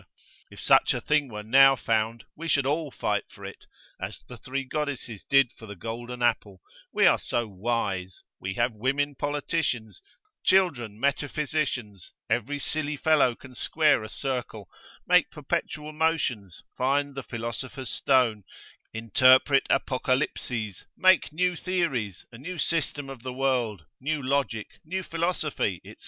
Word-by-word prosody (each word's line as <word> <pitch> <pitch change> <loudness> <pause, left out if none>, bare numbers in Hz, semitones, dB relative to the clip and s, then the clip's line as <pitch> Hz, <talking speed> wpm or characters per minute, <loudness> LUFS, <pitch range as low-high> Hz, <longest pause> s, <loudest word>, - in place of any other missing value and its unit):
If - - -13
such - - +4
a - - -1
thing 150 -2 +1
were 105 -1 -6
now 135 +4 +7
found, 115 -1 -1
we 165 +2 -6
should 145 -4 +2
all 150 +2 0
fight - - -1
for - - -12
it, - - -10 0.3
as - - -6
the 125 - -9
three 130 +4 -4
goddesses 135 -6 -4
did 135 -3 +4
for 110 - -13
the 100 - -8
golden 120 +4 -5
apple, 105 -5 0 0.3
we - - +3
are - - +6
so 120 -1 -1
wise: 100 -3 -2 0.2
we 95 +1 -4
have 120 0 +1
women 140 +6 0
politicians, 145 - -2 0.4
children 135 - +2
metaphysicians; 140 - -2 0.2
every 145 +6 0
silly 150 +1 -2
fellow 145 -5 +3
can 130 +1 -14
square 150 +3 +2
a 110 - -7
circle, 120 -7 -4 0.4
make - - +5
perpetual 150 0 -3
motions, 150 - -1
find 140 +2 +1
the 135 - -5
philosopher's 120 +2 -5
stone, 125 -6 +2 0.5
interpret 130 +5 +5
Apocalypses, 125 - -1
make 185 -3 +5
new 180 +3 +1
Theories, 160 - -2
a 115 - -11
new 180 +7 -6
system 145 -2 -1
of 135 -3 -9
the 130 0 -5
world, 125 -9 0
new 150 +3 -1
Logic, 130 -5 0 0.2
new 185 +4 -3
Philosophy, 165 - -1
&c. - - -11
130 Hz, 145 wpm, -27 LUFS, 115-145 Hz, 0.5 s, now